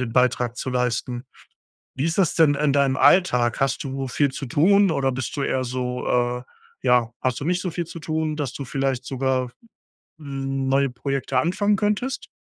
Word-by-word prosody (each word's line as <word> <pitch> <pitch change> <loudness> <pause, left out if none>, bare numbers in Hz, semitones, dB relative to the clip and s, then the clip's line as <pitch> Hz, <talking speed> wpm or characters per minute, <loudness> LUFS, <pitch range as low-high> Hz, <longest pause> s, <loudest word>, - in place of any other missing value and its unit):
den 120 -2 -3
Beitrag 125 -1 +2
zu 130 - -3
leisten. 125 0 -1 0.7
Wie 135 - -1
ist 165 0 -1
das 190 -5 +3
denn 155 -3 +5
in 145 0 +1
deinem 140 -1 +2
Alltag? 125 -10 +4
Hast 135 0 0
du 135 -1 -4
viel 140 +2 +1
zu 135 - -6
tun 190 +9 +4
oder 135 -3 +1
bist 130 -1 -4
du 145 - -2
eher 130 -1 0
so, 125 0 -3
äh 125 0 0 0.4
ja, 125 -2 +3
hast 130 -2 0
du - - -3
nicht 180 +2 +1
so 185 - -2
viel 170 +1 -3
zu 165 +1 -9
tun, 155 -1 -2
dass 145 -5 -3
du 140 - -5
vielleicht 135 -1 -2
sogar 130 -1 -1 0.7
neue 135 -2 -1
Projekte 135 +2 -2
anfangen 205 +5 +2
könntest? 215 +5 -1
135 Hz, 185 wpm, -23 LUFS, 125-155 Hz, 0.7 s, denn